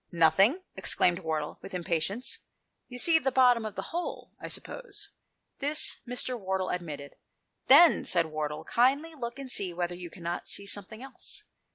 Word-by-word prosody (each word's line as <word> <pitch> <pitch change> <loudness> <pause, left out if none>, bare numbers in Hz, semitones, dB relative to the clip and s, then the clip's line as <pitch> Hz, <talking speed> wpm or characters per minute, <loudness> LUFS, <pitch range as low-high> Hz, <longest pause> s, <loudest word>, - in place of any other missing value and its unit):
"Nothing?" 190 - +4
exclaimed 175 0 +2
Wardle 155 -4 -3
with 195 - -8
im 180 - -3
patience. 180 +9 -1 0.5
"You 250 - -8
see 320 +5 +4
the 265 -3 0
bottom 245 -3 +4
of 215 - -5
the 190 - -5
hole, 345 +1 -4
I - - -6
suppose?" - - -5 0.5
This 295 +2 +1
Mr. 250 0 -2
Batchel 190 0 -1
admitted. 150 -5 -6 0.3
" - - -49
Then," 315 +5 +8
said 170 -2 +3
Wardle, 155 0 -4
" - - -33
kindly 280 +7 +3
look 240 -4 -6
and 270 -2 -4
see 185 -6 +1
whether 175 0 -2
you 175 -1 -8
cannot 170 0 -5
see 200 - -2
something 205 +4 -3
else." 270 -1 -8
200 Hz, 175 wpm, -29 LUFS, 170-260 Hz, 0.5 s, Then